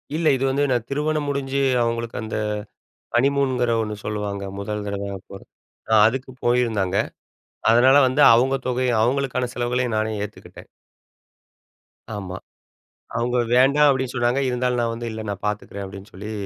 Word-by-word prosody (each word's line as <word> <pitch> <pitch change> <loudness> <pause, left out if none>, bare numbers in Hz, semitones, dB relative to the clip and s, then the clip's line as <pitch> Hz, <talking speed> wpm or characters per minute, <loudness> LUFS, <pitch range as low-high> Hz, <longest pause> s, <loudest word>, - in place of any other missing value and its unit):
இல்ல. 160 0 +1
இது 130 - -2
வந்து 140 +2 +1
நான் 120 -2 0
திருமணம் 150 +1 -1
முடிஞ்சு 140 -1 -1 0.2
அவுங்களுக்கு 115 0 -2
அந்த 110 - -5 0.8
ஹனிமூன்ங்கிற 130 -2 +2
ஒண்ணு 105 -1 -3
சொல்லுவாங்க. 105 -1 -3 0.2
முதல் 105 +1 -4
தடவை 100 0 -4 0.2
போறது 95 - -11 0.4
அ - - +4
அதுக்கு 130 +3 -3
போயிருந்தாங்க. 110 -6 +1 0.7
அதனால 130 +4 +6
வந்து 130 +3 +1
அவுங்க 130 +3 +3
தொகையும் 125 -2 +1
அவுங்களுக்கான 125 0 0
செலவுகளையும் 120 -1 -1
நானே 110 0 0
ஏத்துக்கிட்டேன். 105 - -11 1.5
ஆமா. 95 -2 -6 0.8
அவுங்க 120 +1 0 0.2
"வேண்டாம்" 140 +4 +5
அப்படின்னு 130 -1 -1
சொன்னாங்க, 120 +2 +1
இருந்தாலும், 125 0 0
நான் 115 -1 -1
வந்து, 115 0 -5
"இல்ல 110 0 -5
நான் 100 0 -6
பாத்துக்கிறேன்" 105 -1 -4
அப்படின்னு 100 +2 -11
சொல்லி 105 +3 -7
120 Hz, 140 wpm, -22 LUFS, 105-130 Hz, 1.5 s, அதனால